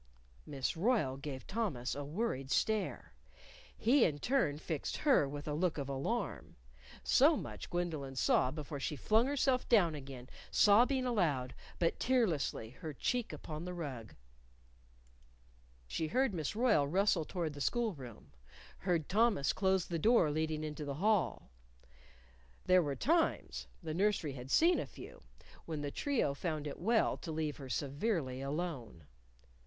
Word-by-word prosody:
_" -, -, -28 dB, 0.4 s
Miss 135 Hz, -3 st, -2 dB
Royle 175 Hz, -, +1 dB
gave 135 Hz, -1 st, -7 dB
Thomas 190 Hz, -, -2 dB
a 145 Hz, -, -4 dB
worried 145 Hz, -, -3 dB
stare. 215 Hz, +7 st, 0 dB, 0.6 s
He, 250 Hz, +2 st, +4 dB
in 150 Hz, -3 st, +2 dB
turn, 175 Hz, -, +1 dB
fixed 155 Hz, -1 st, -3 dB
her 270 Hz, -, +3 dB
with 145 Hz, +1 st, -7 dB
a 150 Hz, -, -1 dB
look 165 Hz, +2 st, 0 dB
of 140 Hz, -2 st, -3 dB
alarm. 135 Hz, 0 st, -3 dB, 0.5 s
So -, -, +5 dB
much -, -, -7 dB
Gwendolyn 160 Hz, -6 st, -3 dB
saw 130 Hz, -, +3 dB
before 145 Hz, 0 st, -6 dB
she 150 Hz, -, -2 dB
flung 220 Hz, -, +2 dB
herself 270 Hz, -2 st, +1 dB
down 190 Hz, -9 st, +5 dB
again, 135 Hz, -4 st, -8 dB, 0.2 s
sobbing 245 Hz, +6 st, +4 dB
aloud, 155 Hz, -, 0 dB, 0.2 s
but 165 Hz, -1 st, 0 dB
tearlessly, 175 Hz, -, 0 dB
her 155 Hz, -2 st, -5 dB
cheek 245 Hz, -, -1 dB
upon 155 Hz, 0 st, -7 dB
the 180 Hz, 0 st, -5 dB
rug. 130 Hz, -, -6 dB, 1.7 s
She 155 Hz, -, -2 dB
heard 255 Hz, +5 st, +1 dB
Miss 160 Hz, +2 st, -3 dB
Royle 215 Hz, -, +3 dB
rustle 185 Hz, +1 st, +2 dB
toward 165 Hz, -2 st, -3 dB
the 145 Hz, -, -8 dB
school 235 Hz, -, 0 dB
room; 120 Hz, -, -11 dB, 0.5 s
heard 175 Hz, -5 st, 0 dB
Thomas 210 Hz, -8 st, +2 dB
close 190 Hz, -2 st, +1 dB
the 170 Hz, -2 st, -3 dB
door 215 Hz, -5 st, +4 dB
leading 155 Hz, 0 st, -1 dB
into 150 Hz, 0 st, -5 dB
the 140 Hz, -1 st, -4 dB
hall. 185 Hz, -, +1 dB, 1.1 s
There 185 Hz, 0 st, +5 dB
were 145 Hz, -4 st, -2 dB
times 325 Hz, -, 0 dB, 0.2 s
the 160 Hz, -1 st, -3 dB
nursery 190 Hz, -5 st, +1 dB
had 125 Hz, 0 st, -8 dB
seen 340 Hz, -, +4 dB
a -, -, -3 dB
few -, -, -12 dB, 0.5 s
when 155 Hz, -3 st, -3 dB
the 145 Hz, -1 st, -3 dB
trio 270 Hz, -, 0 dB
found 155 Hz, 0 st, -3 dB
it 145 Hz, -, -6 dB
well 225 Hz, +5 st, +2 dB
to 165 Hz, -, -7 dB
let 155 Hz, -2 st, -2 dB
her 135 Hz, -2 st, -9 dB
severely 140 Hz, -, -1 dB
alone. 135 Hz, -, -4 dB
160 Hz, 150 wpm, -34 LUFS, 140-210 Hz, 1.7 s, So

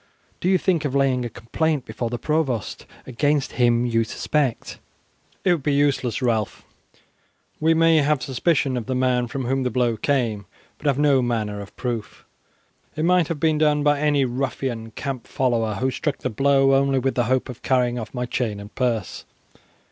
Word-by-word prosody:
Do 180 Hz, -, 0 dB
you 190 Hz, -, +4 dB
think 175 Hz, -3 st, 0 dB
of 140 Hz, -2 st, -2 dB
laying 135 Hz, -2 st, +2 dB
a -, -, -3 dB
complaint 145 Hz, +5 st, -2 dB
before 115 Hz, +2 st, -4 dB
the 120 Hz, -, -3 dB
provost 135 Hz, -6 st, -2 dB, 0.2 s
against 145 Hz, +3 st, 0 dB
him 120 Hz, 0 st, +3 dB
you 115 Hz, -1 st, +1 dB
suspect?" 135 Hz, +2 st, -2 dB, 0.6 s
"It 185 Hz, -, +3 dB
would 165 Hz, -, -2 dB
be 140 Hz, +1 st, 0 dB
useless, 140 Hz, -4 st, +1 dB
Ralph. 110 Hz, -4 st, -1 dB, 0.9 s
We 160 Hz, +1 st, +3 dB
may 165 Hz, 0 st, +4 dB
have 150 Hz, -1 st, +2 dB
suspicion 135 Hz, -1 st, 0 dB
of 120 Hz, -, -5 dB
the 130 Hz, -, -1 dB
man 125 Hz, -1 st, +1 dB
from 130 Hz, +1 st, -4 dB
whom 135 Hz, +2 st, 0 dB
the 125 Hz, -, 0 dB
blow 120 Hz, -3 st, 0 dB
came, 115 Hz, -7 st, -1 dB, 0.3 s
but 150 Hz, -, -4 dB
have 140 Hz, -2 st, +2 dB
no 145 Hz, -2 st, +4 dB
manner 110 Hz, -4 st, -2 dB
of 100 Hz, -, -12 dB
proof. 120 Hz, -4 st, -5 dB, 0.7 s
It 155 Hz, +1 st, -1 dB
might 180 Hz, -2 st, +3 dB
have 165 Hz, -3 st, -3 dB
been 155 Hz, -1 st, +2 dB
done 150 Hz, -1 st, +3 dB
by 145 Hz, -1 st, +3 dB
any 145 Hz, -2 st, +2 dB
ruffian 125 Hz, -2 st, -3 dB
camp 130 Hz, +2 st, -5 dB
follower 115 Hz, -5 st, 0 dB
who 130 Hz, +5 st, 0 dB
struck 145 Hz, +1 st, -2 dB
the 130 Hz, -, -3 dB
blow 135 Hz, +3 st, +3 dB
only 135 Hz, 0 st, +3 dB
with 130 Hz, +1 st, 0 dB
the 120 Hz, -, +1 dB
hope 130 Hz, +2 st, 0 dB
of 125 Hz, -3 st, -9 dB
carrying 125 Hz, -2 st, +1 dB
off 110 Hz, -, -7 dB
my 125 Hz, -1 st, -3 dB
chain 120 Hz, -4 st, -2 dB
and 100 Hz, +1 st, -11 dB
purse. 120 Hz, -5 st, -2 dB
130 Hz, 185 wpm, -23 LUFS, 120-145 Hz, 0.9 s, you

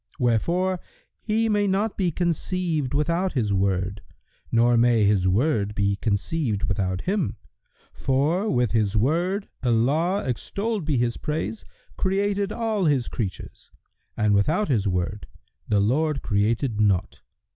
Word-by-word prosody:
wherefore 170 Hz, -, +1 dB, 0.4 s
He 225 Hz, +1 st, +1 dB
may 205 Hz, -2 st, +2 dB
not 200 Hz, +3 st, 0 dB
be 185 Hz, -3 st, +1 dB
conceived 170 Hz, -4 st, -1 dB
without 170 Hz, +5 st, 0 dB
His 110 Hz, -7 st, 0 dB
Word, 95 Hz, 0 st, 0 dB, 0.5 s
nor 120 Hz, +1 st, +4 dB
may 115 Hz, -1 st, +4 dB
His 100 Hz, -2 st, +3 dB
Word 105 Hz, 0 st, +1 dB
be 100 Hz, 0 st, +1 dB
conceived 110 Hz, -, -1 dB
without 95 Hz, -1 st, -1 dB
Him; 190 Hz, -, -1 dB, 0.6 s
for, 155 Hz, +10 st, 0 dB
with 125 Hz, -4 st, +1 dB
His 110 Hz, -2 st, +1 dB
Word, 175 Hz, -, 0 dB
Allah 145 Hz, -, +1 dB
(extolled 200 Hz, -, -2 dB
be 150 Hz, -4 st, +1 dB
His 120 Hz, 0 st, 0 dB
praise!) 155 Hz, +8 st, -3 dB, 0.3 s
created 200 Hz, +1 st, 0 dB
all 220 Hz, -5 st, -1 dB
His 140 Hz, -6 st, +2 dB
creatures, 100 Hz, -7 st, -6 dB, 0.5 s
and 105 Hz, -1 st, +2 dB
without 155 Hz, -, +2 dB
His 110 Hz, -7 st, +1 dB
Word, 90 Hz, +2 st, -2 dB, 0.4 s
the 105 Hz, -, +2 dB
Lord 135 Hz, +7 st, +1 dB
created 110 Hz, +2 st, 0 dB
naught. 100 Hz, -4 st, +1 dB
130 Hz, 130 wpm, -24 LUFS, -, 0.6 s, nor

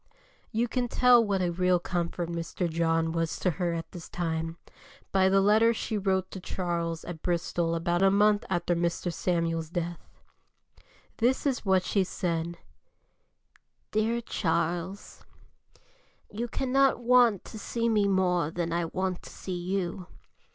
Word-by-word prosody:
You 235 Hz, +1 st, +1 dB
can 245 Hz, +1 st, -1 dB
tell 245 Hz, 0 st, +5 dB
what 200 Hz, -3 st, 0 dB
a 175 Hz, -, 0 dB
real 180 Hz, +1 st, +2 dB
comfort 175 Hz, -1 st, -2 dB
Mr. 170 Hz, +1 st, -3 dB
John 165 Hz, 0 st, +1 dB
was 165 Hz, -1 st, -1 dB
to 180 Hz, -, +1 dB
her 175 Hz, -1 st, +1 dB
at 165 Hz, -, -6 dB
this 170 Hz, -2 st, -9 dB
time, 165 Hz, -1 st, -3 dB, 0.5 s
by 190 Hz, -1 st, +4 dB
the 195 Hz, +1 st, +4 dB
letter 220 Hz, +3 st, +4 dB
she 220 Hz, -, -3 dB
wrote 190 Hz, -2 st, 0 dB
to 190 Hz, -, -6 dB
Charles 170 Hz, -3 st, -3 dB
at 165 Hz, -3 st, -7 dB
Bristol 170 Hz, -1 st, -1 dB
about 175 Hz, +1 st, 0 dB
a 195 Hz, -, +6 dB
month 205 Hz, +1 st, +3 dB
after 175 Hz, -1 st, 0 dB
Mr. 170 Hz, +1 st, -1 dB
Samuel's 165 Hz, -2 st, -1 dB
death. 175 Hz, 0 st, -4 dB, 1.1 s
This 250 Hz, +5 st, +1 dB
is 265 Hz, -5 st, 0 dB
what 190 Hz, -1 st, +4 dB
she 195 Hz, +1 st, +1 dB
said: 170 Hz, -2 st, -3 dB, 1.3 s
"DEAR 225 Hz, +2 st, +1 dB
CHARLES, 170 Hz, -1 st, -2 dB, 1.1 s
"You 230 Hz, +4 st, -3 dB
cannot 270 Hz, +2 st, +2 dB
want 240 Hz, -4 st, +4 dB
to 220 Hz, -, -9 dB
see 230 Hz, +2 st, -2 dB
me 210 Hz, -3 st, +3 dB
more 180 Hz, -4 st, +2 dB
than 170 Hz, 0 st, -3 dB
I 170 Hz, 0 st, 0 dB
want 185 Hz, +2 st, -2 dB
to -, -, -11 dB
see 185 Hz, -, -7 dB
you. 180 Hz, 0 st, -3 dB
180 Hz, 150 wpm, -28 LUFS, 170-205 Hz, 1.3 s, a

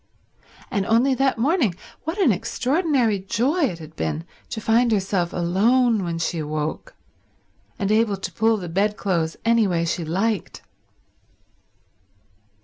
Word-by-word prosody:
And 200 Hz, -5 st, 0 dB
only 240 Hz, +4 st, +3 dB
that 270 Hz, 0 st, +1 dB
morning 255 Hz, -, +1 dB, 0.3 s
what 325 Hz, +5 st, -3 dB
an 360 Hz, -, +4 dB
extraordinary 255 Hz, -, 0 dB
joy 260 Hz, -, +1 dB
it 180 Hz, -10 st, -3 dB
had 160 Hz, -1 st, -12 dB
been 80 Hz, 0 st, -3 dB, 0.2 s
to 225 Hz, -, -4 dB
find 230 Hz, +2 st, +2 dB
herself 190 Hz, -4 st, 0 dB
alone 215 Hz, +6 st, +2 dB
when 170 Hz, -1 st, -3 dB
she 165 Hz, 0 st, -2 dB
woke, 155 Hz, 0 st, -4 dB, 0.8 s
and 200 Hz, 0 st, -1 dB
able 215 Hz, -2 st, +2 dB
to 190 Hz, -1 st, -5 dB
pull 220 Hz, +5 st, +2 dB
the 180 Hz, -4 st, -6 dB
bed 200 Hz, +5 st, 0 dB
clothes 165 Hz, -5 st, -1 dB
any 230 Hz, -2 st, +4 dB
way 170 Hz, -2 st, 0 dB
she 170 Hz, +1 st, -2 dB
liked! 195 Hz, +6 st, -2 dB
205 Hz, 140 wpm, -23 LUFS, 175-240 Hz, 0.8 s, an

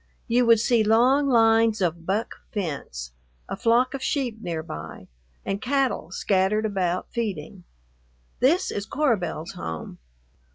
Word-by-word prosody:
You 240 Hz, +1 st, +3 dB
would 230 Hz, -1 st, +6 dB
see 230 Hz, 0 st, +3 dB
long 250 Hz, +6 st, +4 dB
lines 225 Hz, -2 st, +4 dB
of 170 Hz, -2 st, -1 dB
"buck" 205 Hz, +4 st, -1 dB
fence, 140 Hz, -, -4 dB, 0.4 s
a -, -, -4 dB
flock 240 Hz, +2 st, +2 dB
of 275 Hz, -, -4 dB
sheep 250 Hz, -7 st, -2 dB
near 165 Hz, -4 st, -3 dB
by, 80 Hz, -, -8 dB, 0.4 s
and 195 Hz, +1 st, -2 dB
cattle 265 Hz, -, 0 dB
scattered 195 Hz, +3 st, +1 dB
about 185 Hz, -4 st, -1 dB
feeding. 195 Hz, -6 st, -4 dB, 0.7 s
This 335 Hz, +9 st, +3 dB
is 205 Hz, +1 st, -4 dB
Cora 280 Hz, -3 st, +2 dB
Belle's 165 Hz, -2 st, -5 dB
home. 80 Hz, -1 st, -7 dB
215 Hz, 135 wpm, -25 LUFS, 180-240 Hz, 0.7 s, would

